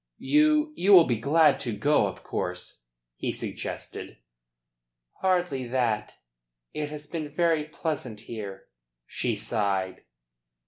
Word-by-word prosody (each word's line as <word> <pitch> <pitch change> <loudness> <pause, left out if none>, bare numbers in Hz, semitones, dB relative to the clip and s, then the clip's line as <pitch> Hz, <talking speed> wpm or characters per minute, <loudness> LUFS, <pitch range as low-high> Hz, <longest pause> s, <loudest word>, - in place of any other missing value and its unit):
"You 305 0 +3
you 195 +3 +4
will 180 -3 +10
be 120 -7 0
glad 150 +4 +4
to 120 -4 -3
go, 145 +8 +3
of - - -8
course?" - - -4 0.3
he - - -2
suggested. - - -6 1.0
"Hardly 175 -9 +1
that. 115 -4 0 0.6
It 150 -1 -3
has 150 0 -8
been 155 -1 -5
very 160 0 +1
pleasant 150 -8 -4
here." 105 -4 -7 0.4
She - - -2
sighed. 100 -4 -1
145 Hz, 120 wpm, -27 LUFS, 110-165 Hz, 1.0 s, will